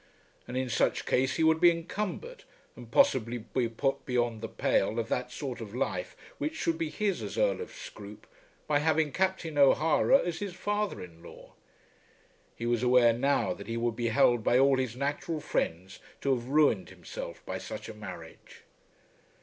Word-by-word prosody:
And 125 Hz, -, -4 dB
in 130 Hz, 0 st, -1 dB
such 120 Hz, -, +1 dB
case 130 Hz, +1 st, +1 dB
he 165 Hz, -, +1 dB
would 160 Hz, 0 st, +4 dB
be 175 Hz, -, +8 dB
encumbered, 210 Hz, -, -4 dB, 0.3 s
and -, -, -11 dB
possibly 120 Hz, -, +3 dB
be 120 Hz, +1 st, -2 dB
put 135 Hz, +4 st, -1 dB
beyond 120 Hz, -3 st, -1 dB
the 115 Hz, -, -3 dB
pale 105 Hz, +4 st, +1 dB
of 115 Hz, -1 st, -2 dB
that 125 Hz, -, -2 dB
sort 130 Hz, -5 st, -5 dB
of 110 Hz, 0 st, -8 dB
life 135 Hz, -, -2 dB, 0.2 s
which 310 Hz, +1 st, -2 dB
should 330 Hz, 0 st, -1 dB
be 325 Hz, -1 st, -1 dB
his 205 Hz, -, -1 dB
as -, -, -6 dB
Earl -, -, +2 dB
of 455 Hz, -, -6 dB
Scroope, -, -, -10 dB, 0.4 s
by 145 Hz, -1 st, +2 dB
having 155 Hz, 0 st, +2 dB
Captain 180 Hz, -3 st, -1 dB
O'Hara 155 Hz, -, +5 dB
as 175 Hz, -10 st, -3 dB
his 200 Hz, -3 st, -5 dB
father 205 Hz, -, -2 dB
in 85 Hz, -2 st, -13 dB
law. -, -, -13 dB, 1.0 s
He 115 Hz, -, -5 dB
was 120 Hz, -1 st, +1 dB
aware 125 Hz, -2 st, +5 dB
now 120 Hz, -6 st, +1 dB
that 100 Hz, -, -10 dB
he 115 Hz, 0 st, -3 dB
would 115 Hz, -1 st, -1 dB
be 120 Hz, 0 st, -1 dB
held 115 Hz, 0 st, +3 dB
by 120 Hz, -, +3 dB
all 135 Hz, 0 st, +5 dB
his 125 Hz, -3 st, -2 dB
natural 145 Hz, +4 st, -2 dB
friends 95 Hz, -, -3 dB, 0.2 s
to 140 Hz, -, +2 dB
have 120 Hz, -1 st, -3 dB
ruined 150 Hz, +2 st, +3 dB
himself -, -, -8 dB
by -, -, -4 dB
such -, -, -7 dB
a -, -, -7 dB
marriage. 470 Hz, -1 st, -11 dB
140 Hz, 180 wpm, -29 LUFS, 120-180 Hz, 1.0 s, be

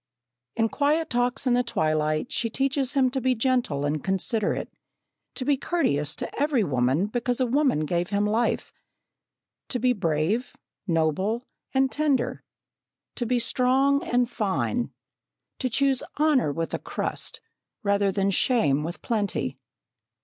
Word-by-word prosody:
In 225 Hz, -, +2 dB
quiet 300 Hz, +6 st, 0 dB
talks 245 Hz, +2 st, 0 dB
in 250 Hz, -, +3 dB
the 245 Hz, -, +4 dB
twilight, 155 Hz, -4 st, 0 dB
she 230 Hz, -, 0 dB
teaches 270 Hz, +2 st, 0 dB
him 260 Hz, -2 st, +3 dB
to 265 Hz, 0 st, -2 dB
be 255 Hz, +1 st, +2 dB
gentle 230 Hz, -, 0 dB
and 145 Hz, 0 st, -1 dB
considerate, 195 Hz, +3 st, 0 dB, 0.6 s
to 255 Hz, -, -3 dB
be 285 Hz, 0 st, +3 dB
courteous 150 Hz, -, 0 dB
to -, -, -5 dB
every 285 Hz, -6 st, +2 dB
woman 130 Hz, +2 st, +1 dB
because 245 Hz, +3 st, -1 dB
a 255 Hz, -, +3 dB
woman 260 Hz, -, +2 dB
gave 175 Hz, +2 st, -1 dB
him 205 Hz, 0 st, +1 dB
life; 220 Hz, +3 st, 0 dB, 0.9 s
to 250 Hz, -, -1 dB
be 250 Hz, +1 st, +2 dB
brave, 190 Hz, +4 st, -1 dB, 0.3 s
noble, 180 Hz, +8 st, 0 dB, 0.3 s
and 265 Hz, 0 st, +2 dB
tender; 290 Hz, -5 st, 0 dB, 0.7 s
to 240 Hz, -, -3 dB
be 250 Hz, +1 st, +2 dB
strong 260 Hz, +4 st, +3 dB
and 245 Hz, 0 st, +1 dB
fine; 235 Hz, +2 st, -1 dB, 0.7 s
to 255 Hz, -, 0 dB
choose 270 Hz, +2 st, +2 dB, 0.2 s
honour 295 Hz, -, +3 dB
with 165 Hz, +3 st, -3 dB
a -, -, -1 dB
crust, -, -, -4 dB, 0.4 s
rather 200 Hz, -1 st, +2 dB
than 195 Hz, 0 st, +1 dB
shame 155 Hz, -, +2 dB
with 170 Hz, +2 st, -6 dB
plenty. 195 Hz, -, -2 dB
235 Hz, 140 wpm, -26 LUFS, 175-260 Hz, 0.9 s, the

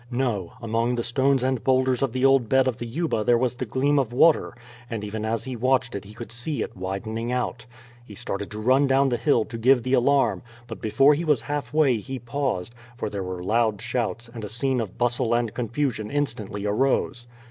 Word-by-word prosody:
No; 120 Hz, -8 st, -2 dB
among 115 Hz, +2 st, 0 dB
the 120 Hz, -, -2 dB
stones 135 Hz, +2 st, +1 dB
and 130 Hz, -2 st, 0 dB
boulders 130 Hz, -1 st, +2 dB
of 135 Hz, -3 st, +1 dB
the 130 Hz, +2 st, 0 dB
old 135 Hz, -4 st, +4 dB
bed 130 Hz, 0 st, +4 dB
of 130 Hz, -, -1 dB
the 120 Hz, -, -5 dB
Yuba 140 Hz, -3 st, -1 dB
there 120 Hz, +2 st, +4 dB
was 125 Hz, 0 st, 0 dB
the 125 Hz, 0 st, -5 dB
gleam 140 Hz, +5 st, +2 dB
of 125 Hz, -4 st, -1 dB
water, 155 Hz, +6 st, +3 dB, 0.3 s
and 115 Hz, -4 st, -4 dB
even 105 Hz, +1 st, -4 dB
as 115 Hz, 0 st, -1 dB
he 130 Hz, 0 st, -5 dB
watched 125 Hz, 0 st, +1 dB
it 100 Hz, -1 st, -5 dB
he 105 Hz, +2 st, -13 dB
could 120 Hz, 0 st, -8 dB
see 125 Hz, +5 st, -2 dB
it -, -, -8 dB
widening 110 Hz, +5 st, -4 dB
out. 125 Hz, 0 st, -3 dB, 0.4 s
He 105 Hz, -4 st, -12 dB
started 100 Hz, +1 st, -5 dB
to 105 Hz, -, -7 dB
run 130 Hz, +5 st, +3 dB
down 135 Hz, +1 st, +3 dB
the 120 Hz, -, 0 dB
hill 120 Hz, -6 st, +2 dB
to 115 Hz, 0 st, -7 dB
give 125 Hz, +1 st, +4 dB
the 130 Hz, -, -1 dB
alarm, 135 Hz, +2 st, +3 dB, 0.2 s
but 115 Hz, -2 st, -9 dB
before 135 Hz, +7 st, +4 dB
he 155 Hz, +4 st, -1 dB
was 150 Hz, -4 st, +2 dB
halfway 145 Hz, -2 st, +1 dB
he 130 Hz, +5 st, -6 dB
paused, 120 Hz, -4 st, -3 dB, 0.2 s
for 105 Hz, -, -3 dB
there 100 Hz, -, -3 dB
were 90 Hz, -1 st, -5 dB
loud 110 Hz, +1 st, +1 dB
shouts, 120 Hz, -1 st, -2 dB
and 115 Hz, -1 st, -9 dB
a 105 Hz, -, -5 dB
scene 125 Hz, +3 st, 0 dB
of 105 Hz, -5 st, -6 dB
bustle 120 Hz, -1 st, +1 dB
and 120 Hz, -2 st, -1 dB
confusion 120 Hz, -2 st, -2 dB
instantly 115 Hz, -8 st, -2 dB
arose. 120 Hz, +2 st, 0 dB
120 Hz, 215 wpm, -24 LUFS, 110-135 Hz, 0.4 s, old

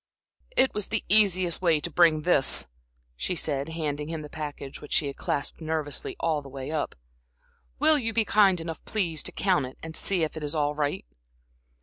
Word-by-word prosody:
"It 265 Hz, -, +4 dB
was 210 Hz, -2 st, -2 dB
the 225 Hz, -, -2 dB
easiest 185 Hz, -5 st, +3 dB
way 165 Hz, -4 st, +4 dB
to 170 Hz, -, -5 dB
bring 155 Hz, -1 st, +4 dB
this," 150 Hz, -6 st, +3 dB, 0.5 s
she 180 Hz, -, -2 dB
said, 145 Hz, -2 st, -1 dB
handing 150 Hz, -3 st, -3 dB
him 160 Hz, -2 st, -4 dB
the 150 Hz, -, -10 dB
package 145 Hz, -3 st, -6 dB
which 150 Hz, -, -6 dB
she -, -, +2 dB
had 140 Hz, -1 st, -4 dB
clasped 140 Hz, -, -2 dB
nervously 155 Hz, -3 st, -2 dB
all 155 Hz, -3 st, +1 dB
the 140 Hz, -, -11 dB
way 135 Hz, +1 st, -6 dB
up. 155 Hz, -2 st, -2 dB, 0.8 s
"Will 305 Hz, +1 st, +5 dB
you 225 Hz, -3 st, -1 dB
be 225 Hz, -1 st, +1 dB
kind 195 Hz, -4 st, +4 dB
enough, 165 Hz, 0 st, -6 dB
please, 170 Hz, -8 st, -1 dB
to -, -, -3 dB
count 180 Hz, -9 st, +1 dB
it 130 Hz, -, -12 dB
and 160 Hz, 0 st, -7 dB
see 185 Hz, -4 st, +1 dB
if 155 Hz, -, -2 dB
it 155 Hz, -, -5 dB
is 150 Hz, +2 st, -3 dB
all 150 Hz, -1 st, +1 dB
right?" 145 Hz, -, -2 dB
160 Hz, 200 wpm, -27 LUFS, 150-185 Hz, 0.8 s, Will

